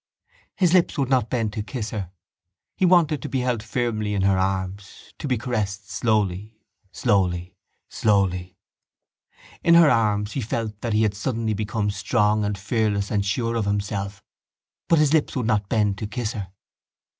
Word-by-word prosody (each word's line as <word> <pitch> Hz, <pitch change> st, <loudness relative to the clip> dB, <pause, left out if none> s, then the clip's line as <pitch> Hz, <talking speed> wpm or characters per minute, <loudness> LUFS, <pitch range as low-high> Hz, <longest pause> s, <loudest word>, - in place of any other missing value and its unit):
His 180 Hz, -3 st, +2 dB
lips 180 Hz, -2 st, +3 dB
would 135 Hz, -3 st, 0 dB
not 125 Hz, -4 st, +2 dB
bend 115 Hz, -4 st, -1 dB
to 105 Hz, -, -3 dB
kiss 110 Hz, 0 st, -5 dB
her. 100 Hz, -5 st, -4 dB, 0.7 s
He 185 Hz, -, +2 dB
wanted 165 Hz, -6 st, +4 dB
to -, -, -5 dB
be 130 Hz, -, -1 dB
held 125 Hz, -3 st, 0 dB
firmly 110 Hz, -2 st, -2 dB
in 95 Hz, -, 0 dB
her 100 Hz, 0 st, +3 dB
arms, 95 Hz, +1 st, -4 dB
to -, -, -4 dB
be 130 Hz, -3 st, +1 dB
caressed 105 Hz, -5 st, -3 dB
slowly, 105 Hz, 0 st, 0 dB, 0.3 s
slowly, 90 Hz, -5 st, 0 dB, 0.3 s
slowly. 95 Hz, -4 st, 0 dB, 1.1 s
In 170 Hz, -, +6 dB
her 165 Hz, -3 st, +7 dB
arms 105 Hz, -2 st, +1 dB
he 135 Hz, -, -3 dB
felt 110 Hz, -1 st, -4 dB
that 115 Hz, -2 st, -2 dB
he 110 Hz, +1 st, +3 dB
had 105 Hz, -2 st, +1 dB
suddenly 110 Hz, +1 st, -2 dB
become 105 Hz, 0 st, -1 dB
strong 105 Hz, +1 st, +1 dB
and 105 Hz, -1 st, -1 dB
fearless 100 Hz, 0 st, -1 dB
and 100 Hz, -2 st, +1 dB
sure 115 Hz, +4 st, -1 dB
of 110 Hz, -3 st, 0 dB
himself. 100 Hz, 0 st, -3 dB, 0.6 s
But 165 Hz, -, +4 dB
his 150 Hz, -1 st, +3 dB
lips 160 Hz, -3 st, +2 dB
would 125 Hz, -4 st, -1 dB
not 105 Hz, -3 st, 0 dB
bend 105 Hz, -3 st, +1 dB
to 110 Hz, -, -3 dB
kiss 120 Hz, +1 st, -3 dB
her. 100 Hz, -5 st, -6 dB
105 Hz, 170 wpm, -24 LUFS, 100-120 Hz, 1.1 s, her